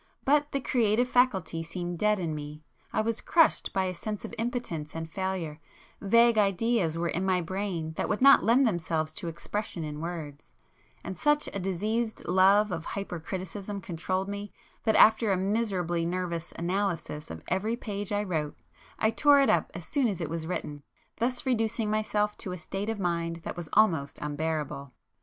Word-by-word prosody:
But 295 +1 +3
the 275 - 0
creative 240 -2 +2
faculty 195 -11 +2
seemed 175 +1 -5
dead 210 -1 +3
in 165 -3 -2
me,—I 150 +7 -6
was 225 +1 -2
crushed 340 -5 +3
by 190 - +1
a 185 - -2
sense 210 +4 -5
of - - -8
impotence 225 -11 -3
and 165 0 -4
failure; 175 -3 -3 0.4
vague 230 +2 +5
ideas 195 -3 +1
were 170 +1 0
in 180 - -1
my 185 -1 +2
brain 175 -2 -3
that - - -1
would 210 - 0
not 275 +1 +7
lend 250 +4 +5
themselves 160 -6 -1
to 175 +1 -5
expression 170 +1 -4
in 150 -1 -5
words,—and 160 - -9
such 295 0 +2
a 200 - -2
diseased 215 +5 -2
love 195 +3 +5
of 165 - -3
hypercriticism 190 +2 -5
controlled 185 +3 -2
me, 205 0 -5 0.3
that 220 - +3
after 220 -1 +6
a 190 - +2
miserably 190 -4 0
nervous 170 -1 -3
analysis 170 -4 -2
of 80 0 -8
every 205 +6 0
page 205 -4 -4
I 205 0 +1
wrote, 155 -6 -2 0.4
I 220 - +2
tore 290 +3 +5
it 275 - +5
up - - +2
as - - -6
soon 280 -4 +1
as 200 -6 -2
it 165 -3 -3
was 165 -1 -3
written, 150 -4 -4 0.4
thus 250 +3 -1
reducing 225 -3 0
myself 210 -1 0
to 185 - -4
a - - -5
state 195 +5 -4
of 225 - -2
mind 170 -2 -1
that - - -5
was 170 -3 -7
almost 160 -10 +3
unbearable. 150 -2 -3
190 Hz, 175 wpm, -28 LUFS, 165-215 Hz, 0.4 s, not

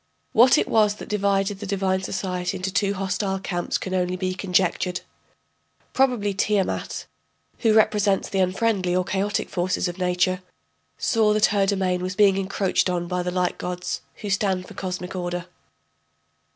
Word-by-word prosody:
What 245 +4 +6
it - - +1
was 210 -2 +3
that - - -9
divided 200 -1 +1
the 205 - -6
divine 190 -1 0
society 185 -1 -3
into 185 +1 -3
two 200 0 +1
hostile 195 0 -1
camps 175 -2 -2
can 185 - -5
only 180 -1 0
be 185 0 -2
conjectured; 180 -1 0 0.9
probably 245 -7 +2
Tiamat, 195 0 -1 0.5
who 225 -3 +3
represents 210 -2 +3
the 195 - -2
unfriendly 185 -1 +1
or 185 - +2
chaotic 200 +2 -1
forces 180 +1 -1
of 175 +1 -6
nature, 180 0 +1 0.6
saw 220 -2 +2
that 210 0 +4
her 200 -1 +2
domain 190 -2 0
was 185 +1 -3
being 200 -2 +5
encroached 195 -1 0
on 175 -1 -1
by 180 0 -1
the 180 - -2
light 180 0 -1
gods, 180 0 -4 0.2
who 205 - -3
stand 190 -2 0
for - - -11
cosmic 185 -1 -5
order. 175 -1 -3
190 Hz, 160 wpm, -24 LUFS, 180-205 Hz, 0.9 s, What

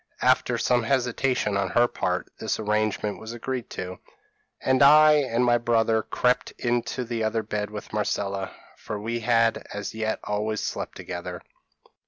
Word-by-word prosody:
After - - +3
some 125 -1 +2
hesitation 125 -3 0
on 100 -1 0
her 120 +5 +4
part, - - -2
this - - -2
arrangement 105 -1 -1
was 110 +1 -7
agreed 125 +1 -4
to, 90 0 -6 0.6
and 130 -1 +2
I 155 +2 +8
and 125 -5 +2
my 120 0 +4
brother 115 -1 +2
crept 125 +3 0
into 120 +1 -1
the 115 -1 -2
other 110 0 0
bed 105 -1 -3
with 105 0 -8
Marcella, 100 -2 -2 0.3
for 105 - -6
we 115 +3 -3
had 115 0 +2
as 105 0 -5
yet 110 0 -2
always 105 +1 -2
slept - - -4
together. - - -6
115 Hz, 155 wpm, -25 LUFS, 105-120 Hz, 0.6 s, I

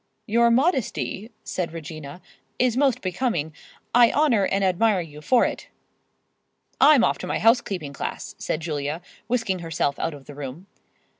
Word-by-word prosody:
"Your 235 +1 +3
modesty," 245 - 0
said 175 -3 -3
Regina, 155 +1 -8 0.3
"is 250 -2 +2
most 270 -2 +2
becoming. 180 - -1 0.4
I 240 -1 +6
honor 255 -10 +3
and 195 0 0
admire 190 +1 +2
you 150 -3 -10
for 250 +10 +4
it—" - - -4 1.1
"I'm 280 -2 +7
off - - +1
to - - -5
my - - -1
housekeeping 200 - +1
class," - - -5
said 155 - -2
Julia, 155 0 -3 0.2
whisking 225 -6 0
herself 160 -4 -2
out 165 - -2
of 140 -2 -14
the 145 - -10
room. 145 +5 -7
190 Hz, 150 wpm, -24 LUFS, 155-235 Hz, 1.1 s, I'm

